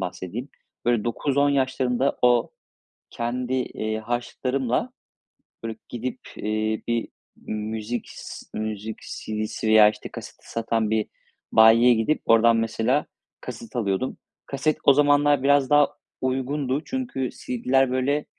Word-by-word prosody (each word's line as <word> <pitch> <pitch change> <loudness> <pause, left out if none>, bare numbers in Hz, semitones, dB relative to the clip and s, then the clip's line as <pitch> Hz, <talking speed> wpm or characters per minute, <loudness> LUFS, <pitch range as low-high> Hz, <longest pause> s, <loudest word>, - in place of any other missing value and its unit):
bahsedeyim. 95 +7 -5 0.4
Böyle, 120 -2 +2
9-10 140 +4 +1
yaşlarında 130 -1 +1
o 120 -1 +4 0.6
kendi, 125 +2 -2
iii, 110 -4 -2
harçlıklarımla, 125 - -2 0.7
böyle, 115 -1 -4
gidip, 125 +2 -4 0.2
iii, 110 0 -2
bir 115 -1 0 0.4
müzik 110 +2 -3
s - - -9
ııı, 110 - -2
müzik 110 0 -5
CD'si 110 +1 -4
veya, 110 -1 +7
işte, 105 - -8
kaseti - - -11
satan 115 -1 0
bir 110 -1 +1 0.5
bayiye 115 +2 +7
gidip 115 +7 +1
oradan 115 0 +5
mesela 115 +5 +1 0.4
kaset 115 - -9
alıyordum. 105 +1 -1 0.3
Kaset 140 +3 0
o 140 - +7
zamanlar 145 -1 +4
biraz 140 -1 +4
daha 145 0 +6 0.3
uygundu. 130 +2 -1
Çünkü 245 - -3
CD'ler, 130 +1 0
böyle, 140 +3 0
120 Hz, 120 wpm, -24 LUFS, 110-135 Hz, 0.7 s, veya